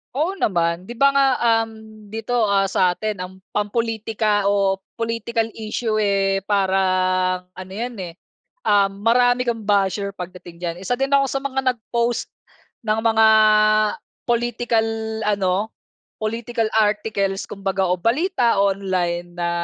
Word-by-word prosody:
Oo 350 Hz, +7 st, -1 dB
naman 170 Hz, -1 st, 0 dB
'di 240 Hz, -, -7 dB
ba 275 Hz, +4 st, +5 dB
nga, 275 Hz, 0 st, +4 dB, 0.4 s
um, 220 Hz, -1 st, -14 dB
dito 225 Hz, +2 st, -1 dB
ah, 200 Hz, -1 st, +3 dB
satin 195 Hz, +3 st, 0 dB
ang 180 Hz, 0 st, -5 dB, 0.2 s
pam-politika 215 Hz, -1 st, 0 dB
o 195 Hz, -1 st, +2 dB, 0.2 s
political 230 Hz, 0 st, -2 dB
issue 220 Hz, 0 st, -2 dB
eh, 195 Hz, -2 st, +1 dB
parang 185 Hz, -2 st, +1 dB
ano 185 Hz, 0 st, -10 dB
yan 235 Hz, +4 st, -4 dB
eh, 175 Hz, -2 st, -6 dB, 0.5 s
um, 200 Hz, -1 st, +4 dB, 0.2 s
marami 245 Hz, +2 st, +3 dB
kang 235 Hz, -2 st, -2 dB
basher 200 Hz, 0 st, +1 dB
pagdating 180 Hz, -1 st, -9 dB
diyan. 170 Hz, -1 st, -2 dB
Isa 195 Hz, +6 st, -1 dB
din 270 Hz, +2 st, -2 dB
ako 280 Hz, 0 st, +4 dB
sa 275 Hz, -, -2 dB
mga 270 Hz, -1 st, -1 dB, 0.2 s
nag-post 235 Hz, +1 st, -2 dB, 0.6 s
ng 215 Hz, 0 st, +2 dB
mga 220 Hz, -1 st, +5 dB, 1.0 s
political 240 Hz, -1 st, +1 dB, 0.4 s
ano, 200 Hz, -3 st, +1 dB, 0.7 s
political 230 Hz, +1 st, -2 dB
articles 205 Hz, -2 st, 0 dB
kumbaga 195 Hz, -1 st, -2 dB
o 180 Hz, 0 st, 0 dB
balita 240 Hz, -, +1 dB
online 185 Hz, -3 st, -1 dB
na 175 Hz, 0 st, -1 dB
210 Hz, 130 wpm, -21 LUFS, 190-230 Hz, 1.0 s, ba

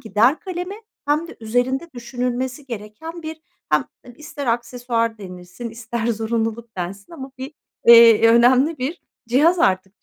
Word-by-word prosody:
gider 225 Hz, +7 st, +2 dB
kalemi 370 Hz, 0 st, -5 dB, 0.3 s
hem 305 Hz, +3 st, 0 dB
de -, -, -11 dB
üzerinde 245 Hz, +8 st, -1 dB
düşünülmesi 250 Hz, +2 st, -4 dB
gereken 240 Hz, +9 st, -8 dB
bir, 315 Hz, 0 st, -7 dB, 0.3 s
hem -, -, +3 dB, 0.3 s
ister 300 Hz, -3 st, -7 dB
aksesuar 235 Hz, -1 st, -1 dB
denilsin, 180 Hz, +4 st, -9 dB
ister 230 Hz, 0 st, -4 dB
zorunluluk 225 Hz, 0 st, -2 dB
densin 195 Hz, -, -6 dB
ama 270 Hz, -4 st, -8 dB
bir, 265 Hz, +3 st, -7 dB, 0.3 s
eee, 230 Hz, -1 st, +8 dB
önemli 255 Hz, +6 st, +4 dB
bir 280 Hz, +8 st, -4 dB, 0.3 s
cihaz 310 Hz, +9 st, +4 dB
artık 190 Hz, -, 0 dB
240 Hz, 130 wpm, -21 LUFS, 225-285 Hz, 0.3 s, eee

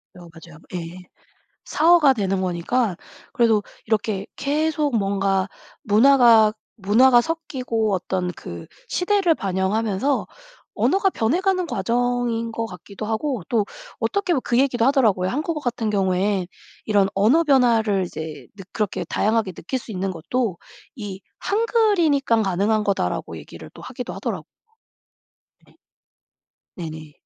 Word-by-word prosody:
여 180 Hz, -, -12 dB
맞아요. 165 Hz, -1 st, -14 dB
예. 170 Hz, 0 st, -5 dB, 0.7 s
사어가 315 Hz, -3 st, +5 dB
되는 195 Hz, -5 st, -1 dB
거니까 185 Hz, +3 st, -1 dB, 0.3 s
그래도 230 Hz, -6 st, +2 dB, 0.2 s
이렇게 210 Hz, -2 st, -1 dB
계속 295 Hz, -2 st, 0 dB
뭔가 195 Hz, -1 st, 0 dB, 0.4 s
문화가 225 Hz, -1 st, +6 dB, 0.2 s
문화가 240 Hz, +4 st, +5 dB
섞이고 250 Hz, -9 st, -2 dB
어떤 180 Hz, 0 st, -2 dB
그 85 Hz, -, -9 dB, 0.2 s
시대를 360 Hz, -3 st, +2 dB
반영하면서 200 Hz, +6 st, -1 dB, 0.5 s
언어가 390 Hz, 0 st, +2 dB
변해가는 365 Hz, -, 0 dB
과정인 235 Hz, 0 st, -1 dB
것 225 Hz, 0 st, -3 dB
같기도 200 Hz, +1 st, -9 dB
하고 225 Hz, -, -2 dB
또 225 Hz, -3 st, +1 dB, 0.4 s
어떻게 400 Hz, -3 st, 0 dB
보면 265 Hz, -, 0 dB
그 240 Hz, -, 0 dB
얘기도 250 Hz, -4 st, +2 dB
하더라고요. 220 Hz, -10 st, +3 dB
한국어 305 Hz, -, -2 dB
같은 240 Hz, -4 st, -2 dB
경우에 190 Hz, -1 st, 0 dB, 0.4 s
이런 205 Hz, -2 st, +3 dB
언어 235 Hz, +12 st, +4 dB
변화를 230 Hz, -, +3 dB
이제 160 Hz, -3 st, -8 dB
느 195 Hz, -, -9 dB
그렇게 210 Hz, -3 st, -2 dB
다양하게 215 Hz, -2 st, 0 dB
느낄 185 Hz, +8 st, -4 dB
수 240 Hz, -, -9 dB
있는 190 Hz, -1 st, -2 dB
것도 185 Hz, +3 st, -2 dB, 0.4 s
이 200 Hz, -5 st, -7 dB, 0.2 s
"한글이니깐 395 Hz, -, +2 dB
가능한 205 Hz, +2 st, +1 dB
거다."라고 200 Hz, -2 st, -2 dB
얘기를 -, -, -11 dB
하기도 -, -, -7 dB
하더라고요. -, -, -4 dB, 1.2 s
네. -, -, -25 dB, 1.0 s
네네. 155 Hz, -3 st, -7 dB
220 Hz, 295 characters per minute, -22 LUFS, 195-270 Hz, 1.2 s, 문화가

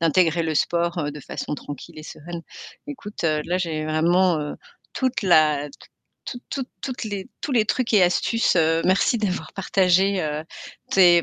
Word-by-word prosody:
d'intégrer 165 Hz, 0 st, +3 dB
le 160 Hz, -1 st, -1 dB
sport, 170 Hz, +1 st, 0 dB
heu, 145 Hz, -2 st, -2 dB
de 150 Hz, -, -9 dB
façon 150 Hz, -, -5 dB
tranquille 145 Hz, +4 st, -9 dB
et -, -, -11 dB
sereine. 170 Hz, +2 st, -8 dB, 0.5 s
Écoute, 210 Hz, -10 st, -7 dB
heu, 155 Hz, -2 st, +1 dB
là 180 Hz, -, 0 dB
j'ai 160 Hz, -3 st, -2 dB
vraiment, 170 Hz, +2 st, +3 dB
heu, 150 Hz, -, -4 dB, 0.4 s
toute 260 Hz, -4 st, -1 dB
la 155 Hz, -5 st, +4 dB, 0.6 s
toute 245 Hz, -1 st, -7 dB
toute 265 Hz, -2 st, -3 dB
toutes 255 Hz, -4 st, -4 dB
les 200 Hz, 0 st, -5 dB
tous 280 Hz, -, -3 dB
les 225 Hz, -3 st, +4 dB
trucs 240 Hz, -2 st, 0 dB
et 195 Hz, -, +6 dB
astuces, 185 Hz, +4 st, +2 dB
heu, 165 Hz, 0 st, +3 dB
merci 190 Hz, +5 st, +3 dB
d'avoir 205 Hz, -4 st, -2 dB
partagé, 190 Hz, 0 st, +2 dB
heu, 150 Hz, 0 st, -2 dB, 0.5 s
tes, 175 Hz, -3 st, +6 dB
175 Hz, 170 wpm, -23 LUFS, 155-200 Hz, 0.6 s, et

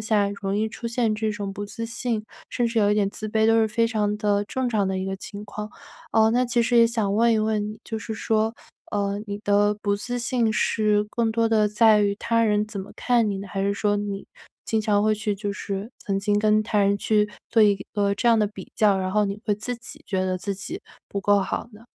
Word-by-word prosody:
况 -, -, -6 dB
下， 210 Hz, -2 st, +2 dB
容 195 Hz, 0 st, -1 dB
易 220 Hz, +1 st, 0 dB
出 235 Hz, +2 st, -7 dB
现 230 Hz, -2 st, +1 dB
这 215 Hz, 0 st, -1 dB
种 205 Hz, -2 st, -4 dB
不 205 Hz, +1 st, -5 dB
自 230 Hz, +3 st, -6 dB
信， 230 Hz, -1 st, -3 dB, 0.2 s
甚 240 Hz, -, 0 dB
至 230 Hz, 0 st, -1 dB
有 205 Hz, -1 st, +4 dB
一 -, -, +3 dB
点 205 Hz, -2 st, +1 dB
自 215 Hz, +1 st, -6 dB
卑， 220 Hz, +1 st, +2 dB
都 225 Hz, 0 st, +4 dB
是 220 Hz, -, +3 dB
非 230 Hz, +2 st, +2 dB
常 210 Hz, -2 st, 0 dB
的 205 Hz, -1 st, +1 dB
正 255 Hz, +4 st, -2 dB
常 210 Hz, -4 st, +1 dB
的 190 Hz, 0 st, -1 dB
一 185 Hz, -, -2 dB
个 195 Hz, 0 st, -3 dB
情 200 Hz, +2 st, -8 dB
况。 210 Hz, 0 st, -6 dB, 0.4 s
呃， 220 Hz, 0 st, +5 dB
那 245 Hz, +2 st, +2 dB
其 240 Hz, -1 st, +1 dB
实 240 Hz, +1 st, +1 dB
也 230 Hz, -, +7 dB
想 220 Hz, -4 st, -1 dB
问 230 Hz, +2 st, +4 dB
一 220 Hz, -, +2 dB
问 215 Hz, -1 st, 0 dB
你， 215 Hz, 0 st, -8 dB
就 220 Hz, -, -4 dB
是 220 Hz, 0 st, -5 dB
说， 220 Hz, 0 st, 0 dB, 0.4 s
呃， 200 Hz, 0 st, -1 dB
你 200 Hz, -1 st, -4 dB
的 205 Hz, 0 st, +2 dB
不 200 Hz, 0 st, +1 dB
自 245 Hz, +4 st, -4 dB
信 235 Hz, -1 st, +1 dB
是 210 Hz, -1 st, +2 dB
更 230 Hz, 0 st, 0 dB
多 230 Hz, 0 st, +1 dB
的 215 Hz, -2 st, +3 dB
在 215 Hz, 0 st, +5 dB
于 200 Hz, -1 st, +2 dB
他 230 Hz, +2 st, +1 dB
人 210 Hz, -1 st, +2 dB
怎 215 Hz, -2 st, -6 dB
么 195 Hz, -, -9 dB
看 240 Hz, -3 st, +2 dB
你？ 195 Hz, -1 st, -3 dB
还 195 Hz, 0 st, -4 dB
是 200 Hz, 0 st, +1 dB
说 205 Hz, 0 st, +1 dB
你 200 Hz, -1 st, -4 dB, 0.4 s
经 220 Hz, -1 st, 0 dB
常 210 Hz, -1 st, +2 dB
会 215 Hz, 0 st, +3 dB
去 210 Hz, -1 st, -2 dB
就 200 Hz, 0 st, -3 dB
是 200 Hz, +2 st, -5 dB
曾 195 Hz, -1 st, -2 dB
经 205 Hz, +1 st, +1 dB
跟 215 Hz, 0 st, +3 dB
他 210 Hz, 0 st, -1 dB
人 200 Hz, 0 st, +3 dB
去 210 Hz, 0 st, +1 dB, 0.2 s
做 225 Hz, -2 st, +5 dB
一 205 Hz, -1 st, +5 dB, 0.2 s
个 200 Hz, -1 st, +1 dB
这 220 Hz, -, -2 dB
样 230 Hz, -1 st, +5 dB
的 210 Hz, -, +3 dB
比 200 Hz, -3 st, -10 dB
较， 205 Hz, -3 st, +4 dB
然 185 Hz, 0 st, -2 dB
后 210 Hz, -1 st, +3 dB
你 200 Hz, +1 st, -4 dB
会 210 Hz, -, +1 dB
自 240 Hz, +4 st, -4 dB
己 290 Hz, +5 st, -11 dB
觉 190 Hz, -2 st, -1 dB
得 185 Hz, 0 st, -1 dB
自 200 Hz, +2 st, -3 dB
己 190 Hz, -, -6 dB, 0.3 s
不 200 Hz, -, -3 dB
够 205 Hz, +1 st, +4 dB
好 195 Hz, +4 st, -3 dB
呢？ 215 Hz, +2 st, -15 dB
210 Hz, 270 characters per minute, -24 LUFS, 200-225 Hz, 0.4 s, 也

